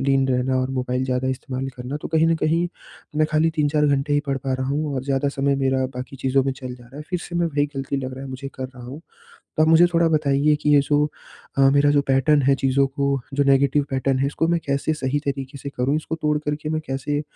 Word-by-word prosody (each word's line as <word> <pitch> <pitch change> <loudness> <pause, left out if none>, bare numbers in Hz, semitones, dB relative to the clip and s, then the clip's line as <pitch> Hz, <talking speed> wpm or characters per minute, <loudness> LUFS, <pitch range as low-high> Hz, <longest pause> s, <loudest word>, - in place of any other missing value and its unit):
लीन 135 0 +2
रहना 130 +1 +1
और 130 - -2
मोबाइल 130 0 -1
ज़्यादा 130 0 -1
इस्तेमाल 130 0 -3
करना। 125 +3 -5
तो - - -4
कहीं 160 0 +3
न 165 - +3
कहीं 165 +3 +1 0.5
मैं 155 - +3
खाली 155 +1 +3
3-4 150 0 +2
घंटे 140 +1 +1
ही 145 - +3
पढ़ 135 -1 0
पा 135 0 -3
रहा 130 0 -2
हूँ 145 0 -1
और 130 0 -3
ज़्यादा 140 0 0
समय 140 0 0
मेरा 130 -1 +1
बाकी 130 +2 -7
चीज़ों 135 +1 +1
में 135 - 0
चल 130 -2 -7
जा 120 -1 -15
रहा 135 +4 -14
है, 150 - -6
फिर 180 - 0
से 175 - -9
मैं 170 -1 +2
वही 145 -2 +1
ग़लती 135 +1 -2
लग 130 -1 -4
रहा 135 +1 -8
है - - -8
मुझे 135 +1 -6
कर 130 - -5
रहा 125 -2 -13
हूँ। 135 +5 -8 0.6
तो 155 - +4
आप 160 - +4
मुझे 165 +2 +7
थोड़ा 165 0 +4
बताइए 150 -1 +2
कि 150 - +2
ये 140 - +7
जो 145 +1 +2 0.5
अ, 135 0 +6
मेरा 145 +1 +4
जो 145 -1 +3
पैटर्न 140 +2 +3
है 135 +1 +4
चीज़ों 135 +1 +2
को 140 0 -1
जो 145 - +2
नेगेटिव 140 +1 +3
पैटर्न 135 0 0
है, 135 - +1
इसको 160 +3 -1
मैं 170 -1 +1
कैसे 140 +3 0
सही 145 -1 -1
तरीक़े 135 0 -4
से 140 - -4
करूँ, 135 +4 +1
इसको 155 +1 -3
तोड़ 150 0 +2
कर 150 0 -2
के 155 - -4
मैं 155 0 -1
कैसे 140 +2 -2
140 Hz, 260 wpm, -22 LUFS, 130-150 Hz, 0.6 s, मुझे